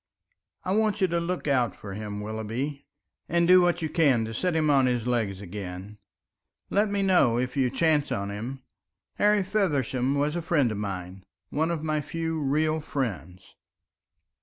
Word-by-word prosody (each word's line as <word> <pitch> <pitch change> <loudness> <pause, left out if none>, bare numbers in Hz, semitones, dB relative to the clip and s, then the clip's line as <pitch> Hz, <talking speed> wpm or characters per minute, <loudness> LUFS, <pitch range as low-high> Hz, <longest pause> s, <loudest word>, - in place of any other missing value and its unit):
I 185 - 0
want 215 -1 +1
you 190 - +4
to 170 +1 +1
look 175 -1 -3
out 125 -4 +2
for 100 -2 -8
him, 105 0 -5
Willoughby, 115 +7 -4 0.4
and 170 +1 +2
do 185 0 +8
what 175 -1 +1
you 160 - -1
can 140 -9 +3
to 115 - -6
set 180 +8 0
him 155 -1 +2
on 135 -2 +4
his 120 -2 0
legs 110 -6 -1
again. 100 +1 -7 0.7
Let 205 +1 +2
me 200 -1 0
know 175 -12 +4
if 125 +2 -2
you 130 -3 +2
chance 150 +2 +2
on 100 0 -2
him. 125 +6 -6 0.5
Harry 210 -1 +3
Feversham 140 - 0
was 145 +2 0
a 175 - -1
friend 150 -7 +2
of 105 - -4
mine 95 -2 -5 0.3
one 160 +3 0
of 165 -3 -2
my 155 -1 0
few 165 +1 -3
real 155 +2 +1
friends." 95 - -5
140 Hz, 175 wpm, -27 LUFS, 110-165 Hz, 0.7 s, do